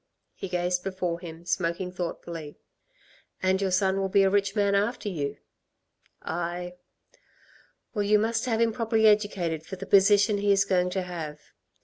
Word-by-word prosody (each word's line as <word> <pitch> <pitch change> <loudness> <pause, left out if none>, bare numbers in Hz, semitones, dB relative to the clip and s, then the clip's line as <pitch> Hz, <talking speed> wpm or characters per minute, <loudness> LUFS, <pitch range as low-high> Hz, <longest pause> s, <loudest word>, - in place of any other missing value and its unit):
He 195 - -7
gazed 180 0 0
before 185 -3 -2
him, 170 -1 -10
smoking 180 0 -1
thoughtfully. 170 -3 -6 0.9
"And 190 +1 +2
your 195 - +1
son 190 +1 +2
will 195 0 -1
be 200 0 +4
a 190 - +3
rich 200 0 +1
man 200 -1 +2
after 210 +2 0
you?" 145 -7 -3 0.9
"Aye." 175 +1 -4 1.2
"Well, 210 - -1
you 205 +1 +4
must 225 +2 0
have 225 -3 0
him 230 -1 +2
properly 225 -1 +1
educated 200 -7 +2
for 190 - -7
the - - -8
position 205 +1 +4
he 200 0 +2
is 200 0 +4
going 180 -2 +1
to 185 0 -2
have." 160 -4 -6
190 Hz, 160 wpm, -27 LUFS, 175-205 Hz, 1.2 s, be